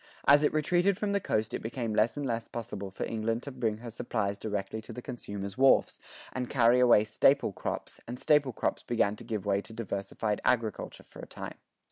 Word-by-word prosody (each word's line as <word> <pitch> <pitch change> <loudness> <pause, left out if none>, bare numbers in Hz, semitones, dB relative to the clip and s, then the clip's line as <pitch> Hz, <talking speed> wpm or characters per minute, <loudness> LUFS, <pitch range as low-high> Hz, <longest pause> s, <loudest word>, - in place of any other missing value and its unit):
As 145 +1 +7
it 150 - +3
retreated 175 +5 +2
from 205 -1 -1
the 200 - +2
coast 110 - -1
it - - -3
became 115 -1 -3
less 110 +5 +2
and 145 - -2
less 115 -2 -2
possible 105 -4 -6
for 95 - -5
England 115 +1 -2
to 140 - -6
bring 115 -5 -1
her 115 +1 -8
supplies 105 -3 -2
directly 105 +1 -3
to 110 - -10
the 115 - -7
consumer's 100 -5 -6
wharfs, 135 0 +4 0.3
and 125 -1 -3
carry 120 -1 +4
away 120 -4 +6
staple 120 +4 +3
crops, - - -5
and 125 +2 -6
staple 150 -3 +3
crops - - -2
began 105 -3 +1
to - - -10
give 110 -3 -4
way 100 -1 +2
to 110 +2 -12
diversified 105 -1 -3
agriculture 115 -4 -1
for - - -15
a - - -8
time. - - -8
115 Hz, 205 wpm, -30 LUFS, 105-130 Hz, 0.3 s, As